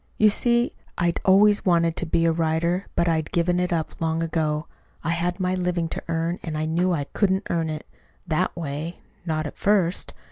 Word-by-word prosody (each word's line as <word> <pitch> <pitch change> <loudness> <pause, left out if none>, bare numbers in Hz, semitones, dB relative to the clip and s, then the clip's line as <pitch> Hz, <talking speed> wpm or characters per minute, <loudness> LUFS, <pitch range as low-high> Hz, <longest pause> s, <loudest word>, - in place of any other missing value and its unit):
You 215 - +6
see 235 +3 +2 0.2
I'd 170 -1 +1
always 205 +2 +5
wanted 170 -2 +3
to 175 - -1
be 165 +1 +2
a 165 - +4
writer, 165 +3 0
but 170 - +2
I'd 160 -2 0
given 175 +1 +2
it 180 0 0
up 165 -1 -2
long 165 0 0
ago. 155 -2 -1 0.4
I 165 - 0
had 175 +2 -1
my 185 0 0
living 180 -2 0
to - - -4
earn, 165 +2 -1
and 155 -2 -4
I 155 - -1
knew 175 +3 +1
I 155 -5 0
couldn't 190 -1 +1
earn 165 -2 0
it 155 -1 -5 0.4
that 175 +2 0
way 160 +1 -5 0.3
not 155 -1 -1
at 150 - -7
first. 195 -4 +1
170 Hz, 200 wpm, -24 LUFS, 160-180 Hz, 0.4 s, You